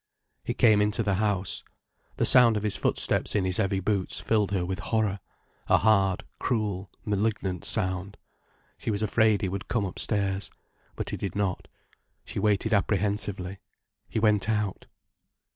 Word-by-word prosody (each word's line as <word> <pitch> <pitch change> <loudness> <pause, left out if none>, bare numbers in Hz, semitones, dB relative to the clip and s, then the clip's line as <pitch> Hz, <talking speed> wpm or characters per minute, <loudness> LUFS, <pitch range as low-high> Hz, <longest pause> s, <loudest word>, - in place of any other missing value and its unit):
He - - -3
came 110 -3 +5
into 105 +2 +1
the 100 -1 +1
house. 100 -3 0 0.5
The - - +2
sound 120 -4 +7
of 105 - -3
his 105 -3 -1
footsteps - - +1
in 100 -3 +2
his 90 -1 0
heavy 95 -2 +1
boots 95 0 -1
filled 105 -3 +1
her 95 -3 -1
with 95 +2 -3
horror: 105 -1 0 0.5
a - - +5
hard, 100 -3 +2 0.2
cruel, 105 -6 -2 0.2
malignant 100 -3 -1
sound. 95 +2 -1 0.6
She - - -4
was 105 0 -1
afraid 110 -1 +2
he - - +1
would 95 +2 -5
come 110 -4 0
upstairs. 100 0 -2 0.5
But - - -4
he - - -3
did 100 - -4
not. 100 -3 -2 0.6
She - - -5
waited 105 +1 +1
apprehensively. 100 -2 -1 0.5
He - - -4
went 105 -1 +2
out. 105 -3 -1
100 Hz, 155 wpm, -27 LUFS, 95-110 Hz, 0.6 s, sound